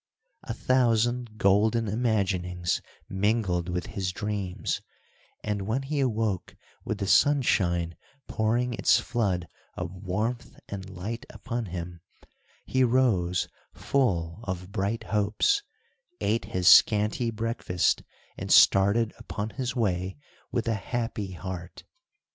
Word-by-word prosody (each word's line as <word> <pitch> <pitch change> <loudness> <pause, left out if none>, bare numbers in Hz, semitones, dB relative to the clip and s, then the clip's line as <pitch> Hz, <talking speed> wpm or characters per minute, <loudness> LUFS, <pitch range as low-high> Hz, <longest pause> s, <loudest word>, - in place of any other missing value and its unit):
A - - -5
thousand 120 -2 +1
golden 110 +3 +3
imaginings 95 -6 0 0.3
mingled 95 -3 0
with 90 0 -2
his 95 -2 -3
dreams, 100 -2 -3 0.6
and, 100 -2 -2
when 125 +5 0
he 145 +2 -2
awoke 110 -7 -1 0.3
with 110 - -3
the 100 - -2
sunshine 90 - +3 0.3
pouring 120 +3 0
its - - +4
flood 100 -7 -1 0.3
of 90 -1 -4
warmth 105 +6 -3
and 100 -1 -6
light 110 +8 -6
upon 120 -2 -4
him, 85 -1 -6 0.6
he 130 0 +2
rose 115 -9 +2 0.3
full 90 -10 0
of 90 0 -5
bright 100 +4 -1
hopes, 105 - +1 0.6
ate 115 +2 0
his 90 -1 -1
scanty 105 +4 +6
breakfast, 115 -5 0 0.4
and - - -4
started 100 +3 +5
upon 110 -2 -5
his 125 -2 -3
way 95 - -1 0.3
with - - -1
a 115 - +2
happy 110 -2 -3
heart. 90 -1 -7
105 Hz, 115 wpm, -27 LUFS, 90-115 Hz, 0.6 s, scanty